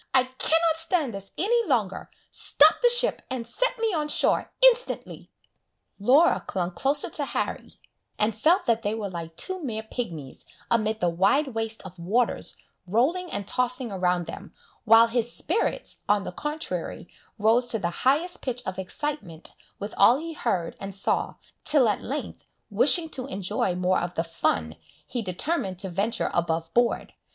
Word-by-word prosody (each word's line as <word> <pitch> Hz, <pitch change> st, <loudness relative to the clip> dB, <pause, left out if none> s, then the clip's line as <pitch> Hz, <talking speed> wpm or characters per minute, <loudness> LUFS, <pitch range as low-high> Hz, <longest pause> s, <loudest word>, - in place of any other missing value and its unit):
I 260 Hz, -, +6 dB
cannot 320 Hz, +5 st, +1 dB
stand 325 Hz, -, 0 dB
this 195 Hz, 0 st, -8 dB
any 465 Hz, +6 st, +2 dB
longer! 220 Hz, -, 0 dB, 0.2 s
Stop -, -, +4 dB
the 485 Hz, -, +6 dB
ship, 485 Hz, +1 st, +1 dB
and 255 Hz, -3 st, -4 dB
set -, -, -1 dB
me 450 Hz, -3 st, 0 dB
on 305 Hz, -3 st, 0 dB
shore 300 Hz, -, +1 dB
instantly!" -, -, +1 dB, 0.7 s
Laura 275 Hz, +11 st, +4 dB
clung 180 Hz, -2 st, -2 dB
closer 275 Hz, +9 st, +1 dB
to -, -, 0 dB
Harry, -, -, -3 dB, 0.4 s
and 215 Hz, +1 st, +1 dB
felt 325 Hz, -, +3 dB
that 230 Hz, -1 st, +2 dB
they 205 Hz, +1 st, -1 dB
were 205 Hz, -3 st, -4 dB
like 165 Hz, -2 st, -7 dB
two 375 Hz, -, -2 dB
mere 220 Hz, -5 st, -3 dB
pigmies, 170 Hz, -, -6 dB, 0.3 s
amid 220 Hz, -1 st, +1 dB
the 175 Hz, -, +3 dB
wide 200 Hz, -, +2 dB
waste 225 Hz, -2 st, -4 dB
of 185 Hz, -2 st, -11 dB
waters, 220 Hz, +8 st, 0 dB, 0.3 s
rolling 295 Hz, -, +1 dB
and 200 Hz, -, -4 dB
tossing 250 Hz, -1 st, -1 dB
around 180 Hz, -2 st, 0 dB
them, 165 Hz, -, -9 dB, 0.3 s
while 225 Hz, +1 st, +8 dB
his 235 Hz, 0 st, -1 dB
spirits, 410 Hz, +7 st, -2 dB
on 205 Hz, -1 st, +3 dB
the -, -, -5 dB
contrary, 300 Hz, -, -4 dB, 0.3 s
rose 230 Hz, +3 st, +3 dB
to 230 Hz, -, +1 dB
the 175 Hz, -5 st, -2 dB
highest 305 Hz, +7 st, +1 dB
pitch 250 Hz, -1 st, -3 dB
of 185 Hz, 0 st, -4 dB
excitement 190 Hz, -, -5 dB, 0.2 s
with 205 Hz, +1 st, -6 dB
all 230 Hz, +6 st, +6 dB
he 325 Hz, +2 st, -6 dB
heard 175 Hz, -, -2 dB
and 195 Hz, -1 st, -5 dB
saw, 195 Hz, -, 0 dB, 0.3 s
till 285 Hz, -5 st, +4 dB
at 210 Hz, -, 0 dB
length, 280 Hz, +5 st, -5 dB, 0.3 s
wishing 340 Hz, -3 st, +4 dB
to 265 Hz, -4 st, -5 dB
enjoy 190 Hz, -6 st, -2 dB
more 180 Hz, +1 st, +1 dB
of 175 Hz, 0 st, -4 dB
the 165 Hz, -, 0 dB
"fun," 85 Hz, -, -1 dB, 0.3 s
he 245 Hz, -, -3 dB
determined 195 Hz, -, -2 dB
to 190 Hz, +1 st, -4 dB
venture 210 Hz, +6 st, -1 dB
above 165 Hz, -1 st, -1 dB
board. 240 Hz, 0 st, +1 dB
230 Hz, 165 wpm, -26 LUFS, 190-295 Hz, 0.7 s, while